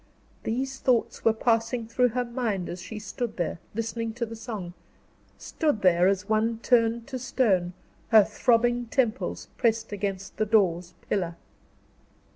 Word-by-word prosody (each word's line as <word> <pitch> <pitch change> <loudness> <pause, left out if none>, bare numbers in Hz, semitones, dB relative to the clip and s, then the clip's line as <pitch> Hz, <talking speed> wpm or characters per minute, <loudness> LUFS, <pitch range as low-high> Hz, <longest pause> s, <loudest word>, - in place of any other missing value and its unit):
These 265 +4 -2
thoughts 245 -3 +1
were 225 - +5
passing 230 +1 0
through 250 +2 +3
her 245 +1 -1
mind 230 -7 -2
as 175 +1 -6
she 195 +4 -7
stood 215 +3 -5
there, 175 -1 -2 0.2
listening 230 0 -3
to 235 +1 -2
the 230 0 -8
song; 215 -6 -6 0.6
stood 295 - -1
there 180 -1 +5
as 195 +1 0
one 220 +1 +1
turned 230 -1 +3
to 260 -1 -5
stone, 200 -8 +1 0.3
her 220 -2 +7
throbbing 240 +3 +2
temples 235 -2 -1
pressed 225 -2 +1
against 195 -1 -4
the 215 - +1
door's 180 -5 +2
pillar. 175 -4 -1
225 Hz, 145 wpm, -27 LUFS, 195-240 Hz, 0.6 s, her